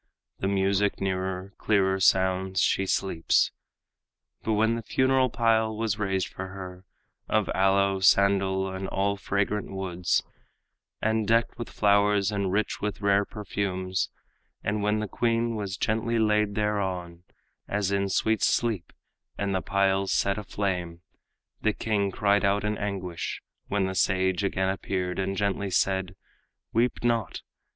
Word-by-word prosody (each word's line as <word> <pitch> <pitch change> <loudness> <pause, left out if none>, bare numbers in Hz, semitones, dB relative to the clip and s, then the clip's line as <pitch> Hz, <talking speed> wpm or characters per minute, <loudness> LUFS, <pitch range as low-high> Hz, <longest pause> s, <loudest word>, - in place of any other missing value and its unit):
The 95 - -1
music 100 +1 +1
nearer, 95 0 -2
clearer 95 -2 +2
sounds; 95 0 +2
she 95 - +2
sleeps. 90 -4 +1 0.9
But 110 - -1
when 110 +2 +3
the 115 - -2
funeral 130 +2 +2
pile 110 -2 +1
was 110 -2 -1
raised 95 -2 0
for 95 - -6
her, 95 -1 -9 0.4
Of 110 -2 +1
aloe, 95 0 +3
sandal, 95 0 +3
and 95 0 -4
all 100 +1 0
fragrant 100 +1 -1
woods, 90 -2 -1 0.8
And 110 -1 +1
decked 115 +2 +2
with 120 - -5
flowers 100 -1 +3
and 100 -2 -1
rich 105 +3 -1
with 105 0 -3
rare 100 0 +3
perfumes, 95 -3 -2 0.5
And 105 +2 -1
when 105 +1 +1
the 110 - -3
queen 115 +2 0
was 100 -3 -4
gently 115 +3 0
laid 105 -2 +2
thereon, 95 -5 -2 0.4
As 100 -1 -1
in 100 0 0
sweet 110 +3 +1
sleep, 110 -7 0 0.4
and 100 -1 -1
the 95 - 0
pile 100 -1 +1
set 100 +1 +1
aflame, 90 -5 -3 0.6
The 110 - +2
king 100 -3 0
cried 100 +1 +2
out 100 +1 +2
in 105 0 0
anguish; 95 -5 -4 0.2
when 100 -1 0
the 95 - -2
sage 95 +1 +1
Again 95 -1 0
appeared, 95 -1 -2
and 95 0 -1
gently 100 -1 -1
said, 95 0 0 0.6
"Weep 120 +2 +1
not! 115 -6 0
100 Hz, 140 wpm, -27 LUFS, 95-105 Hz, 0.9 s, when